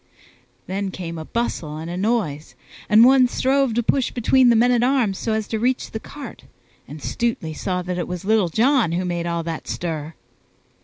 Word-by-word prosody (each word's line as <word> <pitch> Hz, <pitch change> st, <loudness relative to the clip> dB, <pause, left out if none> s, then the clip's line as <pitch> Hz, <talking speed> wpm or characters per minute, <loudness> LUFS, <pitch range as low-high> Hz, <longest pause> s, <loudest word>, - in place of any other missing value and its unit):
Then 195 Hz, +1 st, -3 dB
came 170 Hz, -3 st, -6 dB
a 160 Hz, -, -7 dB
bustle 160 Hz, -10 st, -3 dB
and 160 Hz, +1 st, -6 dB
a 175 Hz, -, -5 dB
noise, 185 Hz, -7 st, -1 dB, 0.3 s
and 220 Hz, +2 st, +7 dB
one 260 Hz, -1 st, +6 dB
strove 265 Hz, -1 st, +1 dB
to 240 Hz, -, +1 dB
push 260 Hz, +2 st, +1 dB
between 250 Hz, +1 st, +3 dB
the 235 Hz, -, +5 dB
men 240 Hz, +2 st, +4 dB
at 240 Hz, -1 st, +3 dB
arms 245 Hz, -6 st, +1 dB
so 225 Hz, -, -1 dB
as 220 Hz, -1 st, -2 dB
to 220 Hz, -, -2 dB
reach 250 Hz, +3 st, -1 dB
the 220 Hz, -, -4 dB
cart, 285 Hz, +5 st, -10 dB, 0.4 s
and 150 Hz, -, -9 dB
Stutely 230 Hz, -10 st, -2 dB
saw 180 Hz, +3 st, -3 dB
that 180 Hz, 0 st, -3 dB
it 175 Hz, -, -3 dB
was 180 Hz, +1 st, -6 dB
Little 210 Hz, -4 st, +2 dB
John 245 Hz, -, +3 dB
that 185 Hz, -, -1 dB
made 175 Hz, -1 st, -2 dB
all 170 Hz, -1 st, -2 dB
that 165 Hz, -1 st, -5 dB
stir. 160 Hz, -2 st, -4 dB
210 Hz, 200 wpm, -22 LUFS, 170-240 Hz, 0.4 s, and